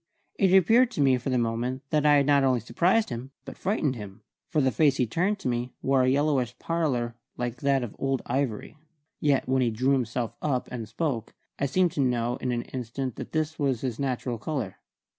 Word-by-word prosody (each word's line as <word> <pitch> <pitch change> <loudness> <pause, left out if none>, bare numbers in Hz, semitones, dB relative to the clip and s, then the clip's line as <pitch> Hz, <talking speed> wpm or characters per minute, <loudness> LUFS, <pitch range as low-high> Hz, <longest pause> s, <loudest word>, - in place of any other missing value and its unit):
It 190 -2 +4
appeared 230 +7 +5
to - - -1
me 130 -2 +4
for 125 - -4
the 130 - +1
moment 120 +3 -1
that 150 -1 +3
I 145 - +6
had 140 -1 +4
not 140 -1 +4
only 130 -2 +3
surprised 180 - +1
him 120 +3 -5 0.2
but - - -8
frightened 165 -9 0
him, 105 -1 -9 0.3
for 155 - +1
the 130 -2 +3
face 145 -2 +3
he 125 - +2
turned 185 - 0
to 195 - -5
me 120 0 -2
wore 135 -1 +3
a 125 - +3
yellowish 135 -3 +1
pallor 140 -9 -1 0.2
like 120 0 -3
that 140 -2 +2
of 120 - -6
old 135 -1 -1
ivory. 130 -4 -2 0.4
Yet 140 -3 +2
when 130 0 +2
he 120 - +2
drew 130 +5 +1
himself 120 -3 -1
up 130 -4 -1
and 115 -4 -5
spoke, 120 -3 -3 0.2
I 140 - +1
seemed 180 +5 +2
to 145 - -1
know 120 -1 0
in 125 - -2
an 120 -1 -1
instant 130 0 -5
that - - -7
this 155 0 -2
was 135 -5 0
his 125 -4 -3
natural 125 -3 -2
colour. 120 -6 -3
130 Hz, 215 wpm, -27 LUFS, 120-145 Hz, 0.4 s, I